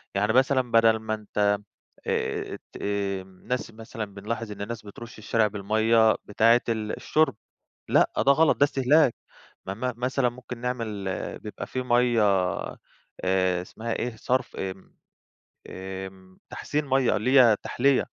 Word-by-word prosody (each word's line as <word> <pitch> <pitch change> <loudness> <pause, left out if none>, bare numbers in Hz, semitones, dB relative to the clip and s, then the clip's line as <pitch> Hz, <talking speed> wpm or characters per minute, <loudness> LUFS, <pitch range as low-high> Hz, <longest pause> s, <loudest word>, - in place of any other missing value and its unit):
يعني 105 +2 +1
مثلًا 130 -1 +2
بدل 115 -1 +5
ما 110 0 -3
أنت 105 -1 0 0.5
آآ - - -2 0.2
ت - - -8
امم 100 -2 -4
ناس 125 -2 -2
مثلًا 110 0 -7
بنلاحظ 105 +3 -5
إن 105 - -8
الناس 110 +1 -6
بترُش 115 +3 -10
الشارع 110 0 +1
بالمَيّة 110 +2 +3
بتاعة 115 +3 +4
ال 110 -2 -2
الشُرب، 155 -7 +1 0.5
لأ، - - +4
ده 140 - +4
غلط 160 +2 +4
ده - - +4
استهلاك، 140 -1 +3 0.5
م - - -2
م 125 +6 -3
مثلًا 125 +1 +1
ممكن 120 0 -9
نعمل 115 -5 -3 0.3
بيبقى - - -7
في 130 - -3
مَيّة 120 -2 +3 1.0
آآ 95 -1 +1
اسمها 115 +5 -5
إيه 120 -1 -3
صرف 125 +3 -1
آمم، 95 0 -7 0.7
آمم 95 0 -8
تحسين 150 0 -2
مَيّة 135 -2 +2
اللي 130 +5 +4
هي 115 -4 +6
تحْليّة، 135 +1 +2
115 Hz, 140 wpm, -26 LUFS, 100-125 Hz, 1.0 s, هي